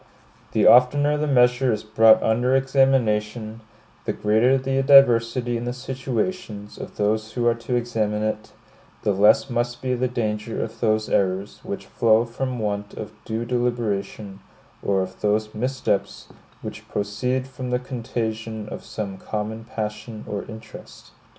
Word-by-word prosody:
The - - +3
oftener 145 +4 +6
the 150 +1 -1
measure 125 -1 +3
is 105 - -2
brought 110 +1 +5
under 120 +4 +2
examination, 115 -5 +1 0.4
the - - -1
greater 110 +5 +3
the 135 0 0
diversity 120 -3 +5
in 120 - -5
the 120 - -2
situations 125 - -4
of - - -9
those 110 +1 0
who 120 0 -1
are 120 - +5
to 120 +2 -4
examine 110 -3 -1
it, 110 0 -3 0.5
the 105 - +2
less 105 +6 +4
must 120 -1 -2
be 130 -1 -1
the 125 +1 0
danger 110 -2 -3
of 115 - -8
those 110 -2 +1
errors 95 +1 0
which 100 - -6
flow 115 0 +3
from 125 +2 -4
want 105 -2 -3
of 105 - -7
due 115 +1 -3
deliberation, 110 -5 -2 0.4
or 95 -1 +1
of 95 0 -9
those 105 +1 0
missteps 125 -3 -2 0.3
which - - -8
proceed 125 +6 -2
from 130 -1 -6
the 125 - +1
contagion 115 -3 -4
of - - -7
some 100 -3 -6
common 110 +1 -4
passion 105 0 -5
or 100 -1 -4
interest. 110 0 -12
115 Hz, 150 wpm, -23 LUFS, 105-125 Hz, 0.5 s, oftener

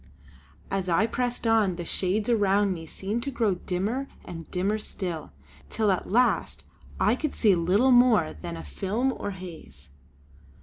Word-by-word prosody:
As 190 -1 -1
I 175 +5 +3
pressed 245 +1 -2
on, 220 -5 +3
the 175 0 -6
shades 195 +5 -1
around 205 -3 +3
me 165 -2 -8
seemed 205 +8 -3
to 280 - -3
grow 230 -6 +1
dimmer 200 +9 -2 0.2
and 165 -2 -8
dimmer 195 +4 0
still; 170 - -5 0.4
till 215 -3 +1
at 185 - -1
the - - -11
last 245 +4 +1 0.4
I - - +3
could 305 -3 -3
see 210 -4 +4
little 185 +9 +3
more 245 - +5
than 85 +2 -7
a 80 - -7
film 210 - -1
or - - -4
haze. 165 - -10
195 Hz, 165 wpm, -27 LUFS, 175-230 Hz, 0.4 s, more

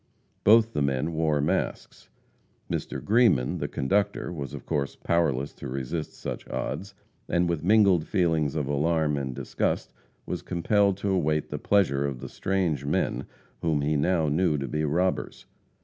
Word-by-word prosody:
Both 115 +2 +5
the 75 - 0
men 70 +3 0
wore 80 -2 +1
masks. 75 - -2 0.6
Mr. - - -3
Greeman, 105 - +3
the - - -2
conductor, 100 +7 0
was 70 -5 -5
of - - -9
course 70 -2 -2
powerless 75 -5 0
to 70 - -8
resist 70 +5 -4
such - - -6
odds, 100 0 -4 0.3
and 85 0 +2
with 85 -3 -1
mingled 100 -4 +4
feelings 80 -6 +1
of 75 -3 0
alarm 75 +2 +1
and 65 -3 -3
disgust - - -2 0.3
was - - -4
compelled 100 +2 +1
to 100 0 -1
await 75 -5 +1
the - - -3
pleasure 85 -9 +2
of 70 -3 -5
the 65 0 -7
strange 90 -7 -1
men - - -1 0.3
whom 80 -3 +1
he 75 +2 +1
now 80 +2 +2
knew 80 +1 +2
to 70 -1 -3
be 75 0 -2
robbers. 90 +5 -1
80 Hz, 160 wpm, -27 LUFS, 70-95 Hz, 0.6 s, Both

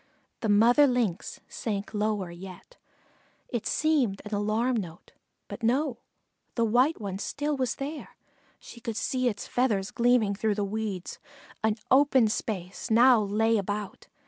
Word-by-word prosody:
The 220 - -2
mother 235 +8 +6
Lynx 240 -9 -1
sank 205 -2 -4
lower 210 -4 -1
yet. 185 - -11 0.7
It 240 -4 -3
seemed 280 -11 +1
an 210 - -7
alarm 215 +5 +1
note; 175 -5 -7 0.4
but - - -8
no, 250 +2 +1 0.6
the 230 - +2
white 250 +8 +2
one 195 -2 -5
still 295 +7 -2
was 255 -3 -1
there; 290 +3 -6 0.4
she 235 - -13
could 225 -1 -4
see 255 +2 0
its 205 -3 -6
feathers 215 -6 0
gleaming 240 -4 +3
through 210 +1 0
the 205 - -1
weeds. 200 -3 -4 0.4
An 220 -1 +2 0.2
open 265 -4 +5
space 195 -1 -4
now 240 +1 +6
lay 220 +2 +2
about. 205 +1 -5
220 Hz, 145 wpm, -27 LUFS, 205-250 Hz, 0.7 s, mother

